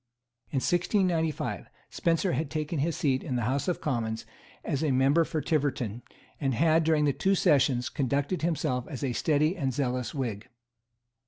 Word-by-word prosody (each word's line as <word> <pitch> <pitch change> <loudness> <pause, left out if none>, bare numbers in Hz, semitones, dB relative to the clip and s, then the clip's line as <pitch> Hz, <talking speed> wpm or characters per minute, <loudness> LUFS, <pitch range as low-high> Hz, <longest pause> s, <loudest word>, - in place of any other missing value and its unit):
In 135 - -1
1695, 175 -2 0 0.2
Spencer 170 +2 +1
had 150 +1 -1
taken 155 0 -2
his 160 +3 0
seat 130 -3 +1
in 130 - -3
the 120 - 0
House 135 +8 -1
of 180 - -1
Commons 115 -5 -2 0.4
as 140 - -1
member 140 +2 +3
for 155 -1 -2
Tiverton, 135 - -1 0.4
and 135 -3 0
had, 160 +3 +3
during 150 -3 +2
two 195 +7 +1
sessions, 130 -7 +3
conducted 140 +6 -1
himself 140 -7 -1
as 140 -4 -6
a 130 -3 0
steady 155 +6 +2
and 140 -8 -1
zealous 125 -2 -2
Whig. 115 -6 -4
145 Hz, 155 wpm, -28 LUFS, 130-160 Hz, 0.4 s, member